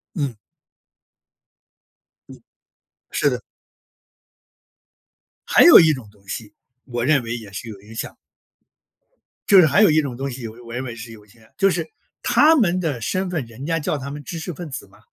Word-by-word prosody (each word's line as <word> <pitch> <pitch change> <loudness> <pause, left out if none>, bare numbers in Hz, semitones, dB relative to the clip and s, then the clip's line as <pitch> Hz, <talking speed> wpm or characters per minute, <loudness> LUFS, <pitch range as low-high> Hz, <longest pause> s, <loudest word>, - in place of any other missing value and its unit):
嗯。 140 - -3 1.9
嗯， - - -13 0.7
是 - - +1
的。 - - -3 2.1
还 - - +6
有 345 - +10
一 160 -3 +5
种 130 -6 -8
东 100 -1 -26
西， 105 0 -7 0.3
我 120 -2 -3
认 140 -2 +3
为 115 0 -4
也 110 -4 -11
是 110 +4 -7
有 100 -3 -10
影 110 +3 -14
响 - - -4
的。 - - -31 1.3
就 195 - +8
是 175 - +7
还 155 +7 +3
有 210 - +6
一 155 0 +4
种 140 -5 -3
东 135 +3 -4
西， 125 -2 -6
我 115 +1 -12
认 125 +2 -4
为 120 -3 -6
是 115 0 -9
有 105 -2 -14
影 105 - -23
响 115 +1 -23
的， 110 - -23
就 195 -1 +3
是 175 -2 -1 0.4
他 315 +2 +5
们 185 - +2
的 150 -9 -3
身 185 - -1
份， 160 -6 -2
人 115 +4 -10
家 165 +1 0
叫 150 0 -2
他 140 0 -7
们 145 0 -8
知 170 - -6
识 165 +2 -5
分 170 +1 -8
子 130 -6 -7
嘛。 100 +1 -22
135 Hz, 205 characters per minute, -21 LUFS, 115-165 Hz, 2.1 s, 有